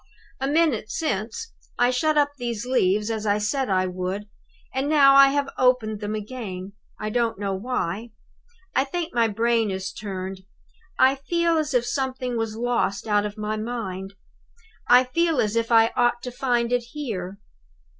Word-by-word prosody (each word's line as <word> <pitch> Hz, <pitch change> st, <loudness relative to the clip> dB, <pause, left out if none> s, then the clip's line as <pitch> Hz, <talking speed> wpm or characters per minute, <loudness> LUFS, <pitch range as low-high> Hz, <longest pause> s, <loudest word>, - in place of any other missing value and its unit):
"A 270 Hz, -, -1 dB
minute 290 Hz, -8 st, +1 dB
since, 225 Hz, -, -3 dB, 0.2 s
I 245 Hz, +1 st, +3 dB
shut 305 Hz, +4 st, +1 dB
up 290 Hz, -1 st, +3 dB
these 235 Hz, -2 st, -3 dB
leaves 210 Hz, -4 st, +1 dB
as 220 Hz, -1 st, -3 dB
I 205 Hz, 0 st, +3 dB
said 215 Hz, +5 st, -1 dB
I 185 Hz, -1 st, +2 dB
would; 185 Hz, +3 st, -4 dB, 0.5 s
and 270 Hz, +2 st, -1 dB
now 280 Hz, -3 st, +6 dB
I 275 Hz, 0 st, +9 dB
have 280 Hz, 0 st, -1 dB
opened 250 Hz, -5 st, +2 dB
them 210 Hz, +1 st, -3 dB
again, 205 Hz, -4 st, -6 dB, 0.3 s
I 215 Hz, 0 st, -3 dB
don't 230 Hz, -2 st, 0 dB
know 200 Hz, -1 st, -2 dB
why. 215 Hz, 0 st, -3 dB, 0.6 s
I 265 Hz, -, +3 dB
think 335 Hz, +4 st, -4 dB
my 235 Hz, -1 st, +3 dB
brain 225 Hz, +1 st, +1 dB
is 190 Hz, 0 st, -4 dB
turned. 190 Hz, -2 st, -5 dB, 0.6 s
I 260 Hz, +1 st, +5 dB
feel 335 Hz, +5 st, 0 dB
as 300 Hz, -3 st, -2 dB
if 240 Hz, -1 st, +2 dB
something 255 Hz, -1 st, -2 dB
was 225 Hz, -1 st, -2 dB
lost 235 Hz, -3 st, -1 dB
out 210 Hz, -1 st, +2 dB
of 205 Hz, +1 st, -10 dB
my 215 Hz, 0 st, -2 dB
mind; 200 Hz, -4 st, -5 dB, 0.7 s
I 250 Hz, +1 st, +7 dB
feel 325 Hz, +4 st, +1 dB
as 210 Hz, +1 st, +1 dB
if 230 Hz, +1 st, 0 dB
I 225 Hz, 0 st, +5 dB
ought 240 Hz, 0 st, +2 dB
to 250 Hz, -, -5 dB
find 245 Hz, -2 st, 0 dB
it 245 Hz, -, +2 dB
here. 200 Hz, -10 st, -5 dB
235 Hz, 170 wpm, -24 LUFS, 210-260 Hz, 0.7 s, I